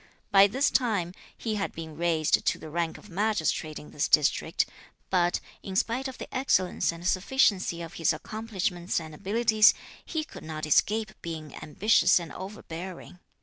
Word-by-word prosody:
By 200 0 +8
this 265 +8 +1
time, 205 -9 +1 0.2
he 225 - -3
had - - -2
been 160 -1 -8
raised 165 -1 +2
to - - +1
the 155 - -10
rank 170 0 -1
of - - -15
Magistrate 175 -6 -1
in 150 - -11
this 145 - 0
district; 150 -2 +3 0.5
but, 175 -2 +2 0.2
in 190 - -7
spite 240 +7 0
of 260 - -8
the - - -8
excellence 190 -12 +1
and 170 +1 -6
sufficiency 190 -4 +2
of 165 - -9
his 165 - +4
accomplishments 185 -1 -3
and 160 -1 -9
abilities, 215 +5 +4 0.3
he 315 -2 -3
could - - -11
not 155 -1 -5
escape 210 +7 +2
being 160 -3 -6
ambitious 200 +6 +3
and 165 -4 -8
overbearing. 185 -2 -8
185 Hz, 160 wpm, -28 LUFS, 165-215 Hz, 0.5 s, By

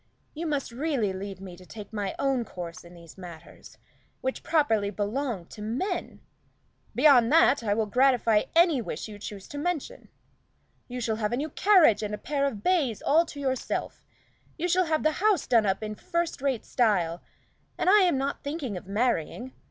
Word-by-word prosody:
You 325 +2 -4
must 285 -5 -2
leave 210 -9 -2
me 185 -2 -9
to 185 - -15
take 210 +3 -11
my 205 -3 -3
own 270 -3 +1
course 175 -5 -8
in 175 +1 -14
these 170 +1 -14
matters, 175 -3 -12 0.4
which 260 0 -3
properly 225 -11 +1
belong 210 0 -3
to 210 - -10
men. 270 - -3 0.7
Beyond 260 -5 +5
that, 295 -4 +5
I 205 -2 +1
will 220 0 +1
gratify 240 -1 +3
any 335 -6 +5
wish - - -5
you 215 - -9
may 205 - -11
choose 200 -2 -8
to 290 - -6
mention. 340 -1 -3 0.8
You 250 0 -5
shall 225 -2 -1
have 215 0 -1
a - - 0
new 300 +4 -2
carriage 355 - +5
and 210 0 -3
a - - -10
pair 280 +2 -1
of 215 -7 -5
bays 290 - +1
all 325 +4 +3
to 285 - -9
yourself; 260 -2 -3 0.5
you 345 +2 -1
shall 365 +1 +3
have 315 -1 0
the 310 - +3
house 425 -3 +3
done 225 -4 +3
up 195 +2 0
in 215 0 -4
first 340 - -3
rate 270 -5 -1
style, 180 -8 +1 0.6
and - - -1
I 410 +3 +7
am 355 -7 +3
not 275 +1 -3
thinking 280 - -4
of 180 - -10
marrying. 235 +3 -1
245 Hz, 185 wpm, -27 LUFS, 205-300 Hz, 0.8 s, I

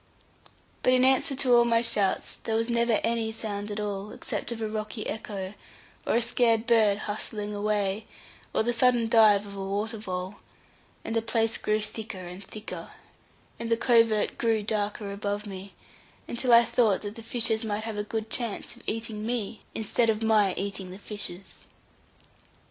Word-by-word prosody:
But 255 - +4
in 255 0 +5
answer 265 +1 +4
to 260 -2 +3
all 240 0 +7
my 230 0 +3
shouts 200 -4 +1
there 220 - -3 0.2
never 235 0 +2
was - - +2
any 230 -1 0
sound 210 -2 -4
at 210 0 -4
all, 205 0 -3
except - - -4
of 235 - -4
a 220 - -1
rocky 215 +1 -4
echo, 200 -3 -4 0.5
or - - +2
a 235 - +4
scared 230 -1 +3
bird 220 -4 +4
hustling 210 0 -4
away, 205 0 -1 0.4
or - - +1
the 240 +2 0
sudden 240 -1 +3
dive 215 -3 +6
of 200 -1 -9
a 195 - -4
water 210 +3 -2
vole; 185 -1 -4 0.7
and 225 - -3
the 225 - +3
place 225 0 +1
grew 215 0 +1
thicker 215 -1 -6
and 180 +3 -8
thicker, 215 +3 -8 0.7
and 230 - -4
the 230 - +3
covert 230 -3 +3
grew 225 -2 +2
darker 205 -1 -2
above 205 +1 -3
me, 195 -1 -8 0.5
until 240 +1 -1
I 235 0 +8
thought 220 -5 +2
that 205 0 -5
the 230 - -10
fishes 225 -1 +1
might 215 -1 -2
have 210 -2 -4
good 220 -1 -3
chance 235 -5 -3
of - - -16
eating 220 -1 -3
me, 225 -2 -3
instead 225 +1 +1
of 220 0 +1
my 210 -4 +4
eating 195 -1 -4
the 185 - -8
fishes. 200 -3 -9
220 Hz, 175 wpm, -27 LUFS, 205-230 Hz, 0.7 s, I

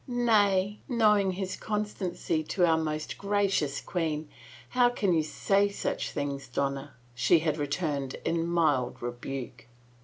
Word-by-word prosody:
" - - -32
Nay, 210 -5 +2
knowing 210 -5 +3
his 190 0 -3
constancy 205 -6 -2
to 180 +3 +2
our 165 -1 +4
most 155 -1 -3
gracious 200 -8 +1
queen, 160 -4 -2 0.4
how 245 -1 +4
can 205 -6 +1
you 160 - +3
say 200 +6 +1
such 200 - -3
things, 140 -1 -4
Donna?" 140 +3 -3 0.2
she 120 +8 +4
had 155 -1 0
returned 145 -2 -2
in 165 0 0
mild 155 -7 +1
rebuke. 120 -1 -6
165 Hz, 140 wpm, -29 LUFS, 145-200 Hz, 0.4 s, our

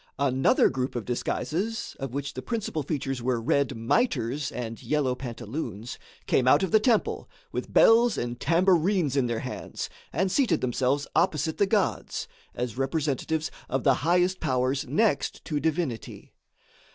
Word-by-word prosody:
Another 135 -1 +3
group 130 0 -3
of 120 -4 -3
disguises 185 - -2
of 135 -3 -4
which 140 +2 -4
the - - -5
principal 220 -9 -3
features 135 -3 -3
were 125 0 0
red 135 +3 +1
mitres 130 - 0
and 115 -2 -5
yellow 145 -4 0
pantaloons 120 -2 -6 0.3
came 125 - +2
out 145 +7 +5
of 185 - -1
the 220 - +6
temple, 225 -1 +1 0.2
with - - -4
bells 230 0 +5
and 120 0 -3
tambourines 170 -1 +2
in 135 -3 +2
their 115 -1 -2
hands, - - -6 0.2
and 185 +5 0
seated 270 +2 +2
themselves 130 +3 0
opposite 160 -2 +1
the 200 - +4
gods, 205 -1 0 0.3
as 125 0 -4
representatives 150 +2 -1 0.2
of 135 0 -1
the 135 - +5
highest 180 +3 +2
powers 130 +2 0
next 205 - 0
to 150 -3 -1
divinity. 155 -7 -3
140 Hz, 150 wpm, -27 LUFS, 125-175 Hz, 0.3 s, the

